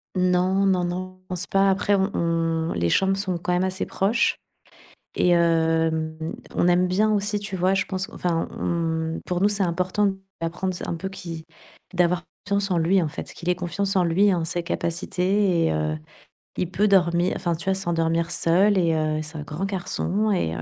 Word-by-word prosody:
Non, 185 +1 +2
non, 185 -2 +2
non, 185 +1 -5
pense 180 -1 -2
pas 195 0 +3
après, 195 +1 +1
on 195 +1 +1
on 165 -1 0
les 85 0 0
chambres 195 - +3
sont 190 -3 -1
quand 180 +1 -2
même 180 +1 +2
assez 190 0 -1
proches, 210 +5 +1 0.8
et 180 - +2
hem, 160 -2 +2 0.4
on - - +2
aime 180 +1 +4
bien 205 +4 +2
aussi 205 0 0
tu 200 -1 -5
vois? 185 +1 +2
Je 195 0 +1
pense 190 0 -4
enfin 170 -2 -1
on 165 -1 -2
pour 180 0 -2
nous 205 - +4
c'est 205 -1 0
important 185 +4 0
de 200 - +3
lui 190 - -11 0.2
apprendre 170 +3 -2
ça - - -6
un - - -2
peu, 190 +3 -5
qui 170 -4 -8 0.5
d'avoir 180 0 +2 0.3
confiance 200 0 0
en 180 - +1
lui 175 +4 +3
en 165 - 0
fait, 150 - -6
qu'il 175 - -5
ait 180 - +3
confiance 195 +3 -2
en 185 - +4
lui 175 +4 +3
et 200 -3 +4
en 165 -2 -1
ses 175 +2 -2
capacités 180 +2 0
et - - +2
heu, 75 0 -1 0.6
il 180 - -1
peut 205 +3 +1
dormir, 175 -2 +3
enfin 170 -1 -1
tu 160 - -7
vois? 190 - +2
S'endormir 170 -3 0
seul 190 +5 +3
et 170 -3 +2
heu, 155 -1 0
c'est 155 +1 -8
un - - -5
grand 155 +6 -4
garçon 195 +2 -1
et 130 - 0
heu 80 - -5
180 Hz, 205 wpm, -24 LUFS, 165-195 Hz, 0.8 s, aime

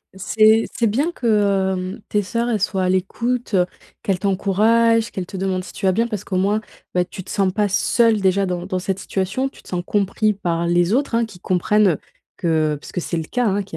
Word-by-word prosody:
c'est 215 +3 +4
c'est 230 - +1
bien 285 +11 0
que, 245 - -5 0.5
hem, 185 +3 -4
tes 210 -1 +1
sœurs, 235 +4 -2
elles 215 -4 0
soient 190 -1 0
à - - +1
l'écoute, 230 +6 -1
heu, 180 -1 +4 0.4
qu'elles 190 -3 0
t'encouragent, 220 +4 +2
qu'elles 185 -2 -5
te 190 - -8
demandent 185 -1 -1
si - - -11
tu 195 - -3
vas 190 - +4
bien 230 +4 +1
parce 210 -3 -4
qu'au 185 - -3
moins, 205 +3 +2 0.3
beh, 180 0 +2
tu 190 +1 -9
te 185 - -12
sens 195 -2 +1
pas 205 +1 +1
seul, 220 +2 +2
déjà, 195 +1 +2
dans 180 0 -3
dans 185 -1 -2
cette 190 +1 -2
situation. 195 +8 -2
Tu - - -18
te - - -17
sens 175 -1 -2
compris 210 +1 +1
par 170 -3 -2
les 175 +3 +2
autres, 275 -2 0
hein, 230 0 +2
qui 200 -5 -14
comprennent 185 0 +2 0.4
que 155 -3 +1
parce - - -11
que 180 - -2
c'est 170 0 -3
le 160 - -3
cas, 245 +7 -1
hein, 200 0 +1
qu'il 185 -4 -9
195 Hz, 230 wpm, -21 LUFS, 185-220 Hz, 0.5 s, c'est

